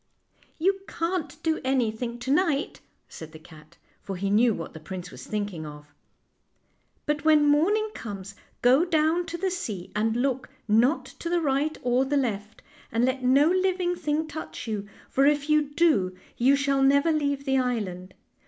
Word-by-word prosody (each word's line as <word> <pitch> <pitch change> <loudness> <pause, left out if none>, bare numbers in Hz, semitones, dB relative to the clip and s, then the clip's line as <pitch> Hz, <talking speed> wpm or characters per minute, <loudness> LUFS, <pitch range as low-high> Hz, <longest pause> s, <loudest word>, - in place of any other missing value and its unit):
" - - -34
You 390 0 +3
can't 330 -4 -3
do 320 -1 0
anything 240 -2 -1
to 265 - -2
night," 300 -2 +1 0.3
said 160 0 -10
the - - -9
cat, 155 0 -17 0.2
for 195 - -5
he 195 +2 -2
knew 230 +3 +4
what 165 -6 -5
the 160 - -9
prince 180 +2 -7
was - - -11
thinking 205 -6 -3
of, 150 -1 -11 0.6
" - - -44
but 295 -1 -1
when 305 -2 +5
morning 355 +10 +3
comes 200 -3 -7 0.3
go 255 +6 +5
down 335 0 +1
to 340 +1 -4
the 380 +2 -1
sea, 210 - -5
and 220 +1 +1
look 260 0 -1 0.2
not 235 +8 +3
to 335 - -7
the 350 0 +2
right 295 0 0
or 250 +1 +2
the 285 +2 0
left, 215 -5 -3 0.3
and 230 +2 +2
let 260 0 -1
no 270 +4 +5
living 365 0 +1
thing 315 -2 -1
touch 315 -4 -7
you, 205 -2 -4 0.2
for 275 +1 +3
if 295 0 +1
you 300 -2 +3
do 290 - +2 0.2
you 265 +4 +4
shall 275 -1 +1
never 280 +4 +4
leave 285 -2 -1
the 270 -1 +2
island. 195 -8 -3
270 Hz, 180 wpm, -26 LUFS, 210-310 Hz, 0.6 s, when